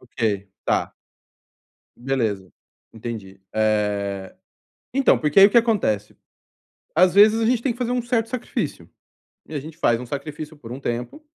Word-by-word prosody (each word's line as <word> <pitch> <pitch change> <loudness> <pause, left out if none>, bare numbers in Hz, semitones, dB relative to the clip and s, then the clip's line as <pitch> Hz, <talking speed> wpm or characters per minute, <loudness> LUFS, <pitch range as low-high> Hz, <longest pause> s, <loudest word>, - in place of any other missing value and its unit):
ok, 105 -5 -2 0.2
tá. - - 0 1.0
Beleza, 115 -8 -2 0.4
entendi. 110 -4 -7
Eh, 105 -3 0 0.6
então, 270 0 +4
porque 150 +4 +3
aí 195 - +11
o 205 - +5
que 235 - +4
acontece? 200 - +1 0.8
Às 180 +2 +5
vezes 215 +3 +6
a 225 - +1
gente 240 0 +2
tem 260 - 0
que 235 - -7
fazer 245 -1 -1
um 250 0 0
certo 235 -1 0
sacrifício 250 0 -4 0.6
e - - -9
a 145 - -2
gente 155 +3 -10
faz 120 -8 +2
um 125 - -7
sacrifício 150 +3 -6
por 120 -5 -10
um 130 - -7
tempo 125 - -4
140 Hz, 160 wpm, -23 LUFS, -, 1.0 s, aí